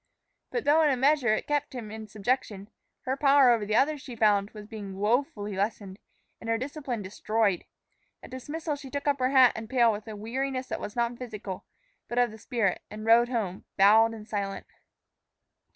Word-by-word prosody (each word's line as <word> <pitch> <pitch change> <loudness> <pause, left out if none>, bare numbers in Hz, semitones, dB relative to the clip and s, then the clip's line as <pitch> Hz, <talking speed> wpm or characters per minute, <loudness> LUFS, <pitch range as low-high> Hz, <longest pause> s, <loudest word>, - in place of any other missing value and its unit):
But 475 - -2
though 300 +2 +4
in 305 - +4
a 265 - +1
measure 265 -4 +3
it - - -4
kept 290 -1 -1
him 220 -4 -6
in 220 0 -8
subjection, 210 -1 -2 0.3
her 260 +1 -2
power 275 -2 +5
over 220 -3 +1
the 215 - 0
others, 290 +2 +2
she 250 -3 -9
found, 205 -2 +3
was 210 -1 -11
being 205 -3 -8
woefully 210 -1 0
lessened, 200 -1 -3 0.4
and 230 - -7
her 230 - +2
discipline 260 -3 -4
destroyed. 205 0 0 0.6
At - - -12
dismissal 295 +4 -4
she 275 -2 -10
took 285 +2 -4
up 285 -1 +2
her 255 0 +2
hat 260 -3 +6
and 220 0 -7
pail 240 -3 +4
with 210 +1 -6
a 215 - -6
weariness 255 +5 -3
that - - -4
was 205 - -6
not 235 0 -1
physical, 210 -6 -7 0.4
but 240 - -5
of 245 -2 +3
the 220 - -12
spirit, 210 -4 -1
and 215 +1 -8
rode 235 +1 +5
home, 210 -7 -3
bowed 220 +3 +5
and 215 -1 -11
silent. 200 -2 -4
230 Hz, 195 wpm, -28 LUFS, 210-265 Hz, 0.6 s, hat